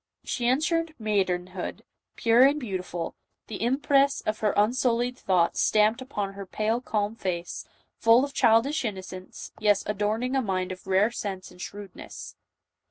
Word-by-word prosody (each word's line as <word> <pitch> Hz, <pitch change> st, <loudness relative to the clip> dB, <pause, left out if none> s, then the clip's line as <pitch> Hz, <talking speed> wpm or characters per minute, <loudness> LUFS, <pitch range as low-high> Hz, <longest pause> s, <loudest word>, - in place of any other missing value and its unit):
She 240 Hz, -, -2 dB
catered 315 Hz, +5 st, +1 dB
maidenhood, 185 Hz, -4 st, -2 dB, 0.3 s
pure 230 Hz, +1 st, +4 dB
and 280 Hz, +3 st, +5 dB
beautiful, 185 Hz, -, -4 dB, 0.3 s
the 210 Hz, -, -7 dB
impress 275 Hz, +3 st, +2 dB
of 215 Hz, 0 st, -2 dB
her 210 Hz, -1 st, +2 dB
unsullied 240 Hz, +3 st, +2 dB
thoughts 180 Hz, -7 st, +1 dB
stamped 215 Hz, +3 st, +3 dB
upon 205 Hz, -7 st, -4 dB
her 195 Hz, -1 st, -8 dB
pale 220 Hz, +5 st, -1 dB
calm 210 Hz, -3 st, -1 dB
face, 175 Hz, -5 st, -4 dB, 0.3 s
full 230 Hz, +4 st, +5 dB
of 280 Hz, -, -10 dB
childish 265 Hz, +8 st, +3 dB
innocence, 185 Hz, -4 st, -6 dB
yet 205 Hz, -2 st, +3 dB
adorning 215 Hz, +5 st, -1 dB
a 265 Hz, -, +3 dB
mind 185 Hz, -4 st, -2 dB
of 185 Hz, +1 st, -9 dB
rare 195 Hz, +4 st, +3 dB
sense 195 Hz, -5 st, -5 dB
and 180 Hz, -, -14 dB
shrewdness. 200 Hz, -1 st, -9 dB
215 Hz, 145 wpm, -27 LUFS, 190-245 Hz, 0.3 s, and